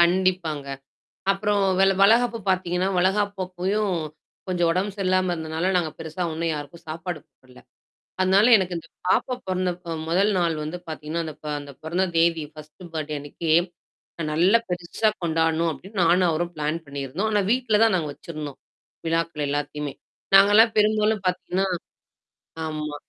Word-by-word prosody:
கண்டிப்பாங்க. 175 -4 +2 0.7
அப்புறம் 205 0 0 0.2
வெள 195 0 +5
வளகாப்பு 230 +3 +4
பாத்தீங்கன்னா, 185 0 0
வளகாப்பு 200 +2 +1
அப்பயும், 190 +2 -1 0.5
கொஞ்சம் 175 -2 +1
உடம்பு 190 +4 -1
சரியில்லாம 185 -2 +1
இருந்தனால, 160 +1 -3
நாங்க 170 -3 +1
பெருசா 160 +2 -5
ஒண்ணும் 165 +1 -1
யாருக்கும் 150 +3 -8
சாப்பாடு 165 +1 -5 0.2
போடல. 130 -1 -17 0.6
அதனால, 190 +3 +5
எனக்கு 185 -3 -1
இந்த 165 - -13 0.2
பாப்பா 250 - +2
பொறந்தப்ப 180 -2 -2
1 195 +5 +3
நாள் 170 -2 +1
வந்து 155 +4 -4
பாத்தீங்கன்னா, 155 +1 -3
அந்த 155 - -6
ப - - -9
அந்த 145 0 -10
பொறந்த 175 +4 0
தேதி 165 -2 +3
ஃபர்ஸ்ட் 155 +3 -13
பர்த்டே 155 -1 -3
அன்னைக்கு 145 +3 -5 0.8
நல்ல 175 +8 +5
பெருசா 175 +4 0
கொண்டாடணும் 165 0 +1
அப்படின்னு 190 +8 -6
நானும் 175 +2 +4
அவரும் 170 +2 -2
பிளான் 155 +2 -1
பண்ணியிருந்தோம். 140 +8 -3
ஆனா, 210 - +3
வீட்ல 245 -4 +2
தான் 225 -3 +3
நாங்க 160 -4 -2
வெச்சிருந்தோம். 150 -3 -8 0.5
விழாக்கள் 165 -2 0
எல்லாத்தையுமே. 145 0 -3 0.4
நாங்கலாம் 205 +4 +7
பெரும்பாலும் 215 0 +3
பாத்தீங்கன்னா 180 +1 0 1.0
ஆமா, 150 -1 -4
175 Hz, 140 wpm, -24 LUFS, 155-190 Hz, 1.0 s, நாங்கலாம்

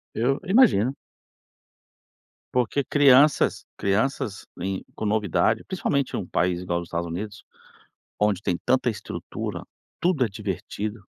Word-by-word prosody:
Eu 130 +5 +1
imagino. 180 - +4 1.6
Porque 125 +3 +1
crianças 145 +1 +5
crianças 105 +1 -1
em 95 +1 -3
com - - -5
novidade 105 0 +1
principalmente 140 -7 -1
em - - 0
um - - -5
país 90 -1 0
igual 85 -1 -1
os 85 - -8
Estados 85 0 -3
Unidos 100 +5 -6 0.8
onde 105 -2 +2
tem 90 -4 0
tanta 130 -1 +3
estrutura, 105 - -5 0.4
tudo 170 -8 +2
é - - -1
divertido, 100 +1 -5
105 Hz, 125 wpm, -25 LUFS, 95-135 Hz, 1.6 s, crianças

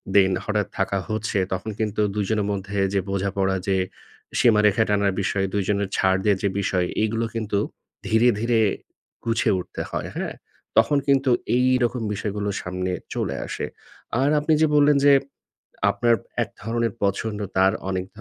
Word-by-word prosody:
Then 95 -1 +6
হঠাৎ 105 -1 0
থাকা 95 0 +1
হচ্ছে 110 -1 -1
তখন 95 +4 -3
কিন্তু 105 -1 -1
২ 105 -1 0
জনের 105 -2 +1
মধ্যে 100 +1 -3
যে 100 - +3
বোঝাপড়া, 95 0 0
যে 95 -1 +2 0.6
সীমারেখা 105 -2 +4
টানার 100 -1 +2
বিষয়, 95 0 0
২ 100 -1 +1
জনের 100 -1 0
ছাড় 95 0 +3
দেয়ার 100 -1 +2
যে 100 - +3
বিষয়, 90 -2 0 0.2
এগুলো 115 +1 0
কিন্তু 105 -3 -1 0.5
ধীরে, 110 +3 +4
ধীরে 115 0 +2 0.7
গুছিয়ে 115 -2 +2
উঠতে 90 - -6
হয়। - - -3
হ্যাঁ? - - -3 0.4
তখন 145 - +5
কিন্তু 135 -1 +3 0.3
এইরকম 125 -1 +2
বিষয়গুলো 105 0 -3
সামনে 90 +1 -3 0.2
চলে - - -1
আসে। - - -3 0.5
আর 135 +2 +3
আপনি 155 +2 +1
যে 160 - +5
বললেন 145 0 +5
যে, 145 - +8 0.8
আপনার 120 -1 +3 0.3
এক - - -4
ধরনের 115 +1 -1
পছন্দ, 105 +2 -1 0.2
তার 95 +1 +5 0.2
অনেক 95 -1 -2
105 Hz, 155 wpm, -23 LUFS, 100-115 Hz, 0.8 s, যে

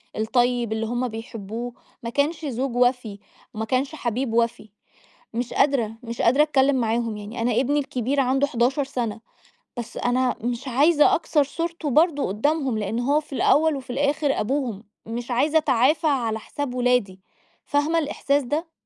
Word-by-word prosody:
الطيّب 240 0 +1
اللي 225 0 -2
هم 245 +2 -1
بيحبوه 225 +1 -6 0.3
ما 230 - -3
كانش 300 +6 -1
زوج 260 -1 -2
وَفِي، 245 -4 +1 0.3
وما 220 +1 -3
كانش 260 +6 -1
حبيب 245 -2 -2
وَفِي. 230 -1 0 0.7
مش 240 +1 -3
قادرة، 250 -6 +2
مش 235 -1 -6
قادرة 270 +6 +5
أتكلّم 280 -2 +3
معاهم 230 -2 0
يعني 210 +3 -7
أنا 245 - +1
ابني 285 +3 +1
الكبير 270 0 -1
عنده 270 +2 +2
11 265 +2 +1
سنة، 235 -5 -3 0.6
بس 235 -1 -6
أنا 250 +1 +1
مش 245 +3 -3
عايزة 295 +5 +4
أكسر 305 -2 +2
صورته 330 +1 -4
برضو 300 - +3
قدّامهم 260 +3 0
لإن 215 +3 -2
هو 285 +5 +2
في 300 - -20
الأوّل 305 +2 +3
وفي 265 -2 -9
الآخر 285 +2 0
أبوهم، 240 -4 -2 0.2
مش 235 +2 -5
عايزة 295 +6 +3
أتعافى 290 +2 +2
على 235 -7 +1
حساب 265 +3 -5
ولادي. 245 -7 +1 0.4
فاهمة 300 +3 +1
الإحساس 285 -2 0
ده؟ 305 +6 -3
255 Hz, 155 wpm, -24 LUFS, 235-285 Hz, 0.7 s, قادرة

